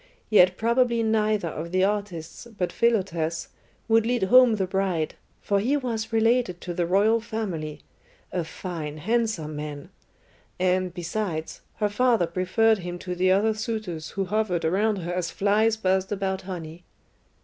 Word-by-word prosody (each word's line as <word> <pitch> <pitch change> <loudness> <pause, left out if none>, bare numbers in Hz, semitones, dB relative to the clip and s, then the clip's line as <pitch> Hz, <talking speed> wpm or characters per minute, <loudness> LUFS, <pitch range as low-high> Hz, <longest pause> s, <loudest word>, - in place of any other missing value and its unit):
Yet 185 -3 +6
probably 235 0 +2
neither 215 -4 +1
of 160 +2 -6
the 185 0 +2
artists, 200 -1 -3
but 180 - -1
Philotas, 175 -8 0 0.4
would 225 0 +4
lead 240 -1 0
home 245 +3 +6
the 195 -2 0
bride, 185 -4 -1 0.3
for 200 -1 +1
he 255 +8 +1
was 230 -5 -3
related 225 -4 +2
to 175 - -5
the 175 -1 -1
royal 210 +5 +3
family 180 -10 -4 0.5
a 175 - -1
fine, 160 -2 -6
handsome 215 -5 -1
man; 150 -1 -6 0.7
and, 185 0 +1
besides, 170 -2 -4
her 210 -1 0
father 230 -2 +2
preferred 185 +6 +2
him 175 -1 -5
to 180 0 -5
the 185 +1 +2
other 210 +3 +3
suitors 215 -8 -4
who 195 - +1
hovered 185 -4 0
around 205 +6 +2
her 175 -2 -4
as 180 -1 -1
flies 215 +3 +2
buzzed 190 -2 0
about 190 -2 -1
honey. 170 -1 -7
190 Hz, 150 wpm, -25 LUFS, 175-220 Hz, 0.7 s, Yet